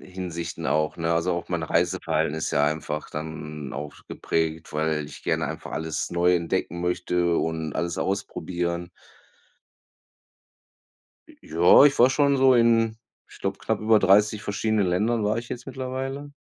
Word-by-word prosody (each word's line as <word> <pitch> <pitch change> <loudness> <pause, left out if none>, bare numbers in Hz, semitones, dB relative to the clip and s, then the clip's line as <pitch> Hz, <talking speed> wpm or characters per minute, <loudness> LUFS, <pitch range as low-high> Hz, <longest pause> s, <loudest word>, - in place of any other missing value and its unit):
Hinsichten 85 -3 -6
auch, 75 0 0
ne? 85 0 -1
Also, 85 +2 +1
auch 85 - -5
meine 80 -3 -2
Reiseplanung 85 -3 0
ist 80 - -3
ja 70 - +2
einfach 75 0 -3
dann 75 -2 -6
auch 75 0 -5 0.2
geprägt, 80 0 -2
weil 75 0 0
ich 75 - -11
gerne - - 0
einfach - - -7
alles 80 -1 -3
neu 90 +1 +3
entdecken 85 0 -2
möchte 90 -1 0
und 80 -1 -2
alles 85 0 -2
ausprobieren. 85 -3 -3 2.4
J - - -18
Ja, 85 - +6
ich 145 -1 +4
war 120 - +7
schon 140 0 +3
so 130 -1 +6
in 115 -2 +3 0.3
ich - - -15
glaub, - - -2
knapp - - -2
über 110 0 +4
30 105 +2 +3
verschiedenen 105 0 0
Ländern 105 +6 +1
war 105 +1 +1
ich 115 0 -6
jetzt 125 0 -6
mittlerweile. 135 +2 -5
90 Hz, 155 wpm, -25 LUFS, 80-110 Hz, 2.4 s, war